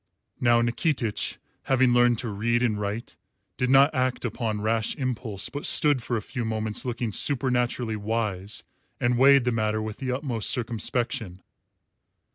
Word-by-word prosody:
Now 120 -2 +4
Nikitich, 120 -1 -1 0.3
having 130 -2 +3
learnt 120 -1 +4
to 120 - -4
read 120 +4 0
and 105 -4 0
write, 105 +4 -4 0.4
did 125 - -1
not 135 +3 +6
act 130 -2 -1
upon 110 -2 -2
rash 110 +1 0
impulse, 120 -7 -3
but 145 - -6
stood 145 -5 +3
for 120 +1 -2
a 110 - -5
few 125 -3 -5
moments 110 0 -2
looking 120 -2 -2
supernaturally 125 -2 0
wise 105 -2 -3 0.4
and 120 0 +1
weighed 135 +1 +6
the 125 - +1
matter 110 -1 0
with 110 -1 -5
the 130 -2 -3
utmost 125 -4 0
circumspection. 115 -4 -2
120 Hz, 150 wpm, -26 LUFS, 110-125 Hz, 0.4 s, not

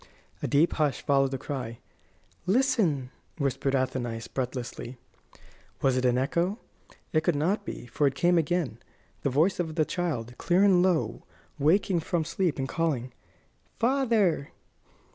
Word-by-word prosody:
A - - -1
deep 150 +4 +3
hush 145 -3 +1
followed 135 -1 +3
the 135 - -3
cry. 125 -5 -5 0.7
"Listen!" 195 - +2 0.3
whispered 140 -1 0
Athenais, 120 -3 -2
breathlessly. 125 -1 -5 0.9
Was 135 -2 +3
it 130 0 +1
an 125 0 +3
echo? 170 - 0 0.6
It 155 - +4
could 160 0 +1
not 170 +9 0
be, - - -6
for 140 +4 +1
it 135 - -1
came 175 +4 +3
again 160 -7 -1 0.4
the 140 - +1
voice 160 +10 +2
of 160 -3 -2
the 155 -2 +2
child, 135 -11 -3
clear 180 +3 +3
and 190 -3 +5
low, 180 -3 +1 0.4
waking 175 +4 +3
from 165 0 -1
sleep, 175 -2 0
and 135 -1 -2
calling: 135 -6 -1 0.6
"Father!" 230 - +2
150 Hz, 145 wpm, -28 LUFS, 130-175 Hz, 0.9 s, and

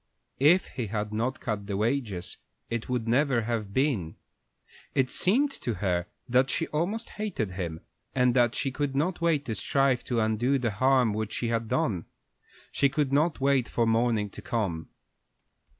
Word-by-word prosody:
If 160 +7 +5
he 120 -4 -4
had 105 0 -3
not 120 +5 -1
cut 105 -3 -3
the 100 -1 -2
wages 110 -5 -2 0.3
it 115 0 -3
would 125 -3 -1
never 125 0 +3
have 110 -3 -2
been. 115 - 0 0.8
It 130 -1 +2
seemed 270 +10 +2
to 120 - -2
her 90 -3 -1 0.2
that 130 +2 +3
she 165 - 0
almost 190 +9 -2
hated 170 - -2
him, 85 -3 -4 0.3
and 125 -1 +3
that 120 -2 +3
she 135 - -1
could 140 0 -2
not 170 +6 0
wait 160 -4 +2
to 115 - -2
strive 135 +4 +1
to 120 -2 0
undo 110 +5 +2
the 120 -4 -1
harm 125 0 +3
which 110 0 -3
she 120 - -1
had 115 -1 -1
done. 110 - 0 0.7
She 140 - +3
could 140 -1 0
not 150 +3 +2
wait 135 -2 +2
for 120 - +1
morning 115 -2 +1
to 105 - -9
come. 95 -6 -2
120 Hz, 170 wpm, -28 LUFS, 105-140 Hz, 0.8 s, If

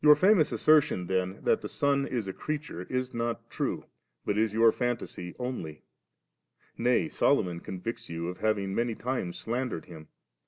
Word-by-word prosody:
Your 150 0 +9
ftmous 185 -4 +4
assertion 150 -12 +4
then, 95 +1 -1
that - - +3
tht - - -5
Son 140 -1 +1
Is 115 -6 -2
a 95 - -3
creature, 150 - -4
is 130 0 -2
not 115 0 -2
true, - - -2 0.4
but 100 - +1
is 110 0 +2
your 115 +1 +5
fantasy 120 -8 -3
only; 125 -12 -5 0.9
najr 125 +6 +2
Solomon 90 -11 +2
convicts 115 +7 -6
you 85 0 -3
of 90 +1 -5
having 100 -3 0
manv 115 +1 0
times 125 -9 -2
slandered 120 -6 -3
him. 80 -3 -11
115 Hz, 160 wpm, -29 LUFS, 95-130 Hz, 0.9 s, Your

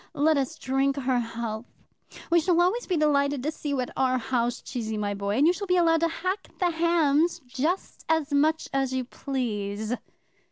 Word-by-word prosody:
Let 310 +2 +3
us 275 -2 -1
drink 270 +1 +1
her 260 -3 +1
health. 230 -1 -4 0.6
We 340 - +6
shall 345 +1 +2
always 375 +8 +2
be 360 - +1
delighted 285 -3 +2
to 305 - 0
see 300 - -6
you 280 -2 0
at 250 - -4
our 255 -1 +2
house, 240 -1 -1
Cheesy, 220 -4 -4
my 205 -1 -1
boy, 200 +1 -2
and 285 - +4
you 345 - +5
shall 400 +2 -5
be 365 0 +3
allowed 330 -2 +4
to 335 - +2
hack 365 +4 -3
the 355 -3 +1
hams 335 0 +2
just 300 +9 -2
as 320 -2 +1
much 310 +3 +2
as 270 -1 +1
you 260 - 0
please." 220 -5 -3
280 Hz, 195 wpm, -26 LUFS, 245-330 Hz, 0.6 s, We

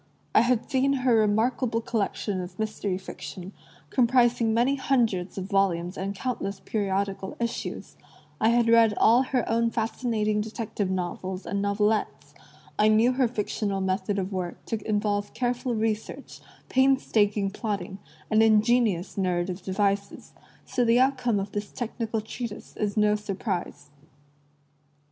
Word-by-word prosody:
I - - +6
had 240 -1 +1
seen 275 0 +2
her 250 - +5
remarkable 225 +2 +2
collection 205 -3 -2
of 180 +1 -8
mystery 215 -3 -2
fiction, 190 0 -8 0.4
comprising 240 -2 +3
many 240 +5 +3
hundreds 235 -10 0
of 190 - -3
volumes 190 -3 0
and 195 +1 -4
count' 250 +4 -3
ess 195 0 -4
periodical 195 -2 -2
issues; 235 0 -4 0.4
I 220 - +4
had 235 0 +3
read 230 -2 +5
all 235 +3 +5
her 255 -2 -1
own 230 0 +2
fascinating 220 -2 -1
detective 215 -2 -3
novels 185 +1 -3
and 200 -1 -2
novelettes; 200 -8 0 0.5
I 210 - +5
knew 220 +3 +4
her 255 -1 +2
fictional 210 -3 -2
method 190 +1 -1
of 195 0 -2
work 180 -2 -4
to 220 -3 -3
involve 205 -1 -1
careful 245 0 -1
research, 220 -1 -3 0.3
painstaking 215 -7 +2
plotting, 200 -3 -4 0.3
and 215 0 +5
ingenious 215 -4 +3
narrative 180 0 -1
devices; 200 +1 -2 0.3
so 255 -1 0
the 235 +1 +4
outcome 255 -5 +2
of 195 +1 -4
this 205 0 -4
technical 230 -2 -3
treatise 220 0 -7
is 210 0 -2
no 210 0 +4
surprise. 195 -7 -4
215 Hz, 135 wpm, -26 LUFS, 195-235 Hz, 0.5 s, I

